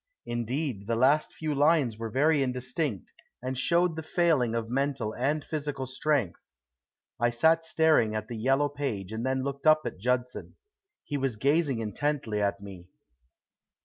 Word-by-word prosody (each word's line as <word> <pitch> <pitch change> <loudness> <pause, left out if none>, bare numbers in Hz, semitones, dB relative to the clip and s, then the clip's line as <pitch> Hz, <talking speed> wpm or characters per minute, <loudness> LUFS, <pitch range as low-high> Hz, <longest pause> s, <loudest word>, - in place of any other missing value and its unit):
Indeed, 120 -2 -3
the 115 - 0
last 135 +6 +3
few 155 -2 -3
lines 145 -4 +3
were 115 +1 -5
very 145 +5 +2
indistinct, 125 - -2 0.3
and 130 +1 -4
showed 170 +6 +2
the 160 - -4
failing 155 -8 +1
of 115 -1 -2
mental 135 -3 -1
and 145 +5 -1
physical 145 -3 -3
strength. 130 - -1 0.8
I 120 +1 +3
sat 160 +8 +3
staring 160 -9 +3
at 110 0 -3
the 120 - -6
yellow 135 +6 +2
page 135 -10 -4
and 110 +1 -4
then 130 0 0
looked 140 +2 -3
up 155 0 +6
at - - -5
Judson. 125 +3 -2 0.5
He 145 - -3
was 135 -4 -1
gazing 140 0 +1
intently 110 -1 -2
at 100 -1 0
me. 95 -3 -10
130 Hz, 155 wpm, -28 LUFS, 115-150 Hz, 0.8 s, up